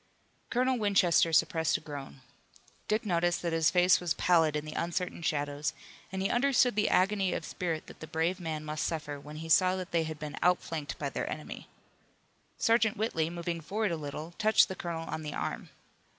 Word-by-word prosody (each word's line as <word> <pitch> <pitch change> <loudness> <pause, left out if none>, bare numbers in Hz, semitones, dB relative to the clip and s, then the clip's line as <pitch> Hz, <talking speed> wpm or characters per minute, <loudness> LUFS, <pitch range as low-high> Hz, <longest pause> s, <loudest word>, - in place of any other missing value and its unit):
Colonel 255 0 +1
Winchester 185 -5 +3
suppressed 160 0 +2
a - - -10
groan. 140 -3 -8 0.7
Dick 215 +1 0
noticed 175 -2 +1
that 170 -1 -1
his 165 -1 +3
face 180 0 +5
was 175 -3 -1
pallid 165 -4 +3
in 150 0 -2
the 155 - -6
uncertain 175 +1 -2
shadows, 145 -1 -1 0.4
and 190 0 -2
he 195 - +1
understood 250 -2 +3
the 210 - +2
agony 190 0 +2
of - - -3
spirit 165 -3 -3
that - - -13
the 155 - -8
brave 165 +4 -1
man 155 -3 -4
must 150 -3 -3
suffer 150 -3 -3
when 150 +2 -10
he 160 +1 -6
saw 185 +3 +4
that 185 -2 -5
they 170 - +2
had 155 -1 -4
been 150 -1 -7
outflanked 165 -4 0
by - - -3
their - - -3
enemy. - - -7 0.9
Sergeant 225 -2 +3
Whitley, 165 -7 0
moving 170 0 -4
forward 205 +5 -1
a - - 0
little, 155 +1 -6
touched 215 0 +5
the 190 - -4
colonel 165 -2 -4
on 160 - -4
the 150 -1 -5
arm. - - -4
170 Hz, 195 wpm, -30 LUFS, 155-190 Hz, 0.9 s, face